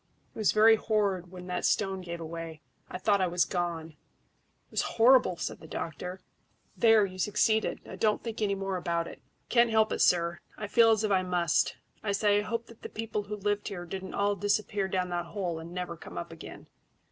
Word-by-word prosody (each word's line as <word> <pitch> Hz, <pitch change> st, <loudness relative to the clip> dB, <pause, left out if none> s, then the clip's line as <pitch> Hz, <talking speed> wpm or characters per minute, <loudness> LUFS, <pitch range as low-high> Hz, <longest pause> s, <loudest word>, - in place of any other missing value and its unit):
It -, -, -10 dB
was 215 Hz, -, +3 dB
very 220 Hz, +1 st, +6 dB
horrid 200 Hz, -5 st, 0 dB
when 180 Hz, 0 st, -10 dB
that 180 Hz, 0 st, -3 dB
stone 195 Hz, -2 st, +1 dB
gave 170 Hz, -1 st, -6 dB
way. 165 Hz, -1 st, -7 dB, 0.3 s
I -, -, -5 dB
thought 200 Hz, +1 st, +2 dB
I 185 Hz, -, +3 dB
was 175 Hz, 0 st, +2 dB
gone." 170 Hz, -3 st, -2 dB
"It 155 Hz, -, -30 dB
was -, -, +1 dB, 0.2 s
horrible!" 235 Hz, -6 st, +5 dB
said -, -, -4 dB
the 160 Hz, -, -12 dB
doctor. 180 Hz, +4 st, -5 dB, 0.5 s
"There, 225 Hz, -3 st, +5 dB
you 185 Hz, -1 st, -8 dB
succeeded; 220 Hz, +3 st, +1 dB
now -, -, -9 dB
don't 215 Hz, -1 st, +1 dB
think 225 Hz, -1 st, -5 dB
any 200 Hz, -2 st, +1 dB
more 195 Hz, -1 st, -2 dB
about 170 Hz, -1 st, -1 dB
it." -, -, -11 dB, 0.3 s
"Can't 235 Hz, -1 st, +4 dB
help 220 Hz, -1 st, +3 dB
it, -, -, -1 dB
sir. 170 Hz, -1 st, +3 dB, 0.2 s
I 215 Hz, -, -4 dB
feel 230 Hz, +2 st, +5 dB
as 220 Hz, -1 st, +3 dB
if 215 Hz, -, 0 dB
I 190 Hz, -1 st, +4 dB
must. 175 Hz, -2 st, +1 dB, 0.2 s
I 200 Hz, -2 st, -1 dB
say, 205 Hz, 0 st, +3 dB
I -, -, 0 dB
hope 230 Hz, +2 st, -3 dB
that 230 Hz, -1 st, -16 dB
the -, -, -7 dB
people 220 Hz, -1 st, -3 dB
who 210 Hz, +1 st, -4 dB
lived 205 Hz, 0 st, -1 dB
here 180 Hz, -4 st, -5 dB
didn't 190 Hz, +1 st, -6 dB
all 205 Hz, 0 st, +1 dB
disappear 205 Hz, -1 st, 0 dB
down 185 Hz, -1 st, -1 dB
that 175 Hz, 0 st, -2 dB
hole 175 Hz, -2 st, -3 dB
and 165 Hz, +1 st, -9 dB
never 180 Hz, -1 st, -4 dB
come 85 Hz, -, -11 dB
up 85 Hz, -, -5 dB
again." -, -, -10 dB
195 Hz, 215 wpm, -29 LUFS, 175-215 Hz, 0.5 s, very